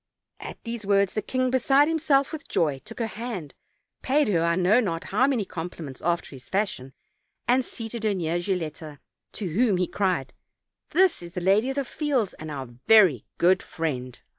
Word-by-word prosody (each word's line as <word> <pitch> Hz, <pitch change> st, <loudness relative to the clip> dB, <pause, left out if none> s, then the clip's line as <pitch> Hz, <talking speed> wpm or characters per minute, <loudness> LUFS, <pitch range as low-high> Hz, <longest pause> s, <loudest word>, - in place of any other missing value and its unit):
At -, -, -8 dB
these 230 Hz, -1 st, -5 dB
words 200 Hz, -1 st, +2 dB
the 215 Hz, -, -1 dB
king, 255 Hz, +1 st, -1 dB
beside 270 Hz, +3 st, +4 dB
himself 300 Hz, -4 st, +2 dB
with 310 Hz, -2 st, -7 dB
joy, 145 Hz, -5 st, 0 dB
took 225 Hz, +1 st, -11 dB
her 230 Hz, -, -1 dB
hand, 220 Hz, -, -6 dB, 0.5 s
paid 285 Hz, -1 st, +2 dB
her 180 Hz, -5 st, +2 dB
I 170 Hz, 0 st, +2 dB
know 185 Hz, +6 st, +4 dB
not 170 Hz, -7 st, -1 dB
how 255 Hz, +6 st, +4 dB
many 245 Hz, -7 st, 0 dB
compliments 165 Hz, -6 st, -7 dB
after 170 Hz, +1 st, -1 dB
hia 135 Hz, -, -10 dB
fashion, 135 Hz, -5 st, -3 dB, 0.5 s
and 255 Hz, +2 st, +4 dB
seated 225 Hz, -1 st, -7 dB
her 210 Hz, -2 st, +1 dB
near 170 Hz, -1 st, -1 dB
Gilletta, 165 Hz, -5 st, -4 dB, 0.4 s
to 210 Hz, -, -5 dB
whom 165 Hz, -, -5 dB
OLD, -, -, +2 dB
OLD 200 Hz, -, +3 dB
PAIItr -, -, 0 dB
he 180 Hz, -, +1 dB
cried: 180 Hz, -10 st, -1 dB, 0.6 s
"This 370 Hz, -, +3 dB
is 170 Hz, 0 st, -10 dB
the 180 Hz, -, -3 dB
lady 200 Hz, +7 st, +3 dB
of 270 Hz, -, -2 dB
the 280 Hz, -1 st, -1 dB
fields, 265 Hz, -, -1 dB
and 155 Hz, -, -7 dB
our 140 Hz, -3 st, -5 dB, 0.2 s
very 190 Hz, -, +6 dB
good 185 Hz, +2 st, +4 dB
friend." 130 Hz, -7 st, -4 dB
195 Hz, 195 wpm, -26 LUFS, 165-245 Hz, 0.6 s, very